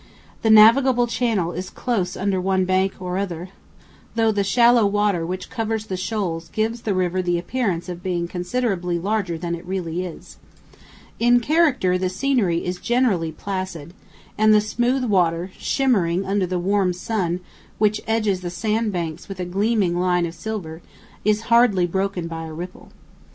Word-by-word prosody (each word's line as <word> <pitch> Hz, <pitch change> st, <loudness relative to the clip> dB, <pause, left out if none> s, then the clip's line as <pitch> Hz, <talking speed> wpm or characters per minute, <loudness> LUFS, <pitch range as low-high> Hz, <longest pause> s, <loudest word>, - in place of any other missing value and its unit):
The 225 Hz, -, +1 dB
navigable 240 Hz, +3 st, +6 dB
channel 225 Hz, -7 st, 0 dB
is 180 Hz, +2 st, -5 dB
close 195 Hz, -7 st, -2 dB
under 190 Hz, -1 st, 0 dB
one 190 Hz, 0 st, +1 dB
bank 190 Hz, +1 st, +1 dB
or 180 Hz, 0 st, -3 dB
other, 180 Hz, -2 st, -4 dB, 0.7 s
though 225 Hz, -1 st, +3 dB
the 205 Hz, -1 st, 0 dB
shallow 235 Hz, +3 st, +4 dB
water 200 Hz, -4 st, +1 dB
which 185 Hz, +1 st, -5 dB
covers 220 Hz, -2 st, -2 dB
the 190 Hz, -, -4 dB
shoals 180 Hz, -4 st, -3 dB
gives 225 Hz, +2 st, -2 dB
the 205 Hz, -4 st, -1 dB
river 185 Hz, 0 st, 0 dB
the 175 Hz, -1 st, 0 dB
appearance 185 Hz, -2 st, -2 dB
of 175 Hz, -1 st, -6 dB
being 175 Hz, -2 st, -2 dB
considerably 180 Hz, -1 st, -1 dB
larger 190 Hz, -2 st, -1 dB
than 170 Hz, +1 st, -4 dB
it 170 Hz, 0 st, -5 dB
really 180 Hz, -2 st, -3 dB
is. 175 Hz, -3 st, -9 dB, 0.8 s
In 240 Hz, +1 st, +5 dB
character 255 Hz, -, +2 dB
the 185 Hz, 0 st, 0 dB
scenery 195 Hz, -5 st, 0 dB
is 180 Hz, 0 st, -3 dB
generally 225 Hz, -10 st, +1 dB
placid, 185 Hz, -2 st, -5 dB, 0.5 s
and 215 Hz, 0 st, +6 dB
the -, -, +6 dB
smooth 240 Hz, +5 st, 0 dB
water, 180 Hz, -5 st, +1 dB
shimmering 195 Hz, -9 st, +1 dB
under 195 Hz, -1 st, 0 dB
the 180 Hz, +1 st, -2 dB
warm 190 Hz, 0 st, +1 dB
sun 180 Hz, -2 st, -2 dB, 0.4 s
which 210 Hz, 0 st, +2 dB
edges 215 Hz, -4 st, +1 dB
the 175 Hz, -, -4 dB
sand 215 Hz, +5 st, -1 dB
banks 170 Hz, -3 st, -4 dB
with 195 Hz, -2 st, -7 dB
a 180 Hz, -, -2 dB
gleaming 195 Hz, 0 st, +1 dB
line 180 Hz, -1 st, +2 dB
of 165 Hz, -, -5 dB
silver, 170 Hz, -3 st, -6 dB, 0.4 s
is 215 Hz, +1 st, +2 dB
hardly 230 Hz, -6 st, +4 dB
broken 190 Hz, 0 st, -2 dB
by 165 Hz, -1 st, -6 dB
a 160 Hz, -, -8 dB
ripple. 175 Hz, +3 st, -8 dB
190 Hz, 165 wpm, -22 LUFS, 175-220 Hz, 0.8 s, navigable